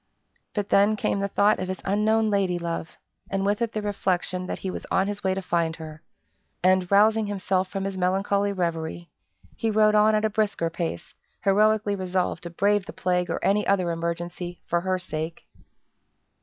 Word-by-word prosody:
But 205 -1 -2
then 205 +2 +4
came 200 - -1
the 200 - 0
thought 205 +2 +3
of 185 - -3
his 185 0 -3
unknown 215 +2 +2
lady 190 -3 +1
love, 170 -1 -4 0.3
and 195 0 -1
with 205 +3 +1
it 230 -1 -1
the 215 - -3
reflection 185 -2 -1
that - - -3
he 190 - -4
was - - -7
on 190 - +2
his 205 0 -4
way 190 -1 +1
to 195 - -4
find 170 -2 0
her; 155 -1 -9 0.6
and, 185 -1 +3
rousing 215 +2 +4
himself 190 -2 0
from 195 +1 -4
his 195 -1 -3
melancholy 200 +2 +1
reverie, 170 -2 -3 0.4
he 225 - -1
rode 215 0 +4
on 215 +1 +5
at 215 0 +1
a - - +2
brisker 205 -6 0
pace, 165 - -4 0.3
heroically 210 +1 +3
resolved 185 -3 -1
to 170 - -6
brave 200 +3 +1
the - - -7
plague 180 -1 0
or - - -1
any 210 +2 +2
other 185 -3 +2
emergency, 170 +1 -4
for 170 0 0
her 185 +1 0
sake. 165 -2 -5
190 Hz, 185 wpm, -25 LUFS, 175-205 Hz, 0.6 s, on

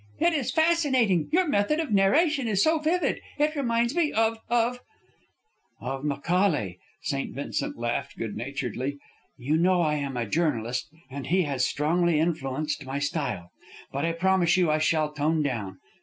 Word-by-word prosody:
"It 345 - +3
is 280 -6 -1
fascinating! 270 - +2
Your 360 +2 +3
method 285 +4 +1
of 320 -7 -2
narration 265 - +3
is 200 -3 +2
so 320 0 +3
vivid! 330 +4 0 0.2
It 300 +1 +1
reminds 235 -3 +1
me 335 -4 +2
of 225 0 +1
of 240 +1 +1 0.5
" 435 - -46
"Of 135 0 -4
Macaulay," 145 - 0 0.2
St. 140 -3 -3
Vincent 140 - -3
laughed, 120 0 -3
good 110 -3 -4
naturedly. 130 +2 -4 0.4
"You 140 +5 0
know 180 +1 +3
I 150 -2 +1
am 140 -3 -3
a 120 - -1
journalist, 125 -3 -1 0.2
and 135 -1 -6
he 185 +2 +3
has 135 -4 0
strongly 165 +2 +1
influenced 155 -2 -1
my 135 +1 -4
style. 140 - -3 0.4
But 140 +3 -1
I 165 - 0
promise 180 0 +2
you 175 -4 +3
I 155 - +2
shall 155 -1 +1
tone 155 +1 +1
down. 105 -9 -3
165 Hz, 165 wpm, -26 LUFS, 140-230 Hz, 0.5 s, It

